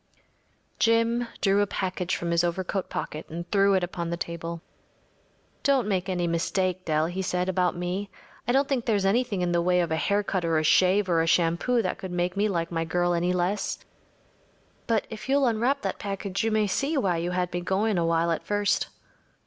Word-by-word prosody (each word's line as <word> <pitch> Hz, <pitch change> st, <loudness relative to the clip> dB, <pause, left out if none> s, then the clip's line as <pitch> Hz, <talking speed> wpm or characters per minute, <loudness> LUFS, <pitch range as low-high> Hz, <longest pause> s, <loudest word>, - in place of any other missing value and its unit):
Jim 230 Hz, +1 st, +2 dB
drew 200 Hz, 0 st, +3 dB
a 205 Hz, -, +1 dB
package 185 Hz, -2 st, -2 dB
from 170 Hz, 0 st, -3 dB
his 170 Hz, 0 st, +3 dB
overcoat 185 Hz, +2 st, -2 dB
pocket 155 Hz, -, -4 dB
and 170 Hz, +2 st, -6 dB
threw 200 Hz, -1 st, +4 dB
it 185 Hz, -, +1 dB
upon 175 Hz, -1 st, -3 dB
the 170 Hz, -, -2 dB
table. 170 Hz, 0 st, -5 dB, 1.0 s
“Don’t 270 Hz, -6 st, +2 dB
make 190 Hz, -2 st, -1 dB
any 180 Hz, -2 st, 0 dB
mistake, 185 Hz, +2 st, 0 dB
Dell,‚ÄĚ 155 Hz, +1 st, +1 dB
he 190 Hz, +2 st, -3 dB
said, 180 Hz, -1 st, -1 dB
“about 180 Hz, -1 st, +1 dB
me. 180 Hz, +3 st, -3 dB, 0.4 s
I -, -, +2 dB
don’t 270 Hz, +2 st, +3 dB
think 265 Hz, -5 st, -1 dB
there’s 205 Hz, -4 st, +1 dB
anything 210 Hz, -1 st, +1 dB
in 175 Hz, -1 st, 0 dB
the 170 Hz, 0 st, +2 dB
way 180 Hz, +1 st, +2 dB
of 170 Hz, -2 st, 0 dB
a 160 Hz, -, +1 dB
haircut 200 Hz, -1 st, 0 dB
or 165 Hz, -1 st, +1 dB
a 155 Hz, -, +1 dB
shave 190 Hz, +5 st, +4 dB
or 170 Hz, -2 st, +3 dB
a 165 Hz, -, 0 dB
shampoo 175 Hz, +9 st, +2 dB
that 185 Hz, -, -2 dB
could 190 Hz, -, -6 dB
make 175 Hz, +1 st, -1 dB
me 210 Hz, +2 st, +1 dB
like 170 Hz, -3 st, -2 dB
my 165 Hz, -1 st, -1 dB
girl 175 Hz, +2 st, 0 dB
any 175 Hz, +1 st, +1 dB
less. 180 Hz, +3 st, -1 dB, 1.1 s
But 225 Hz, -3 st, +1 dB
if 220 Hz, +4 st, -8 dB
you’ll 280 Hz, 0 st, +3 dB
unwrap 245 Hz, +4 st, +1 dB
that -, -, -3 dB
package 200 Hz, -1 st, -3 dB
you 225 Hz, -, +2 dB
may 215 Hz, -1 st, +2 dB
see 280 Hz, +10 st, 0 dB
why 185 Hz, -9 st, +1 dB
you 170 Hz, +1 st, -2 dB
had 180 Hz, -1 st, -1 dB
me 175 Hz, -, -1 dB
going 195 Hz, +2 st, +1 dB
a 170 Hz, -, +1 dB
while 165 Hz, 0 st, +2 dB
at 165 Hz, -, -2 dB
first. 205 Hz, 0 st, +1 dB
185 Hz, 205 wpm, -26 LUFS, 170-205 Hz, 1.1 s, threw